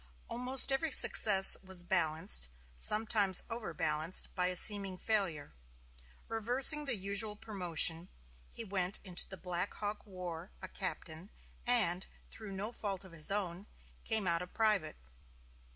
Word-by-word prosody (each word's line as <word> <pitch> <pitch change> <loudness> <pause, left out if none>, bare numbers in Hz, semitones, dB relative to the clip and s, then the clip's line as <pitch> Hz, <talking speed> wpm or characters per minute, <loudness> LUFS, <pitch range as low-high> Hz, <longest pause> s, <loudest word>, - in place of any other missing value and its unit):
Almost 250 +3 +4
every 270 +4 -2
success 195 -7 +5
was 190 -2 -5
balanced 160 - +1 0.3
sometimes 210 - 0
overbalanced 165 -6 -1
by 180 -1 -1
a 180 - -3
seeming 195 -1 +3
failure. 180 -9 -2 0.7
Reversing 250 +7 +4
the 260 -4 -2
usual 200 +2 -1
promotion, 180 -5 0 0.4
he - - -9
went 190 -2 -3
into 180 -3 +2
the 190 - -8
Black 180 +2 -6
Hawk 210 0 -6
War 180 -2 -9
a 185 - -9
captain 180 -2 -7 0.4
and, 200 -7 +2 0.2
through 215 -3 -10
no 200 +4 -6
fault 200 -4 -4
of 190 - -15
his 160 -2 +2
own, 195 -1 -5 0.4
came 220 -3 -1
out 170 -1 -1
a 180 - -8
private. 205 -6 -1
195 Hz, 135 wpm, -32 LUFS, 175-215 Hz, 0.7 s, success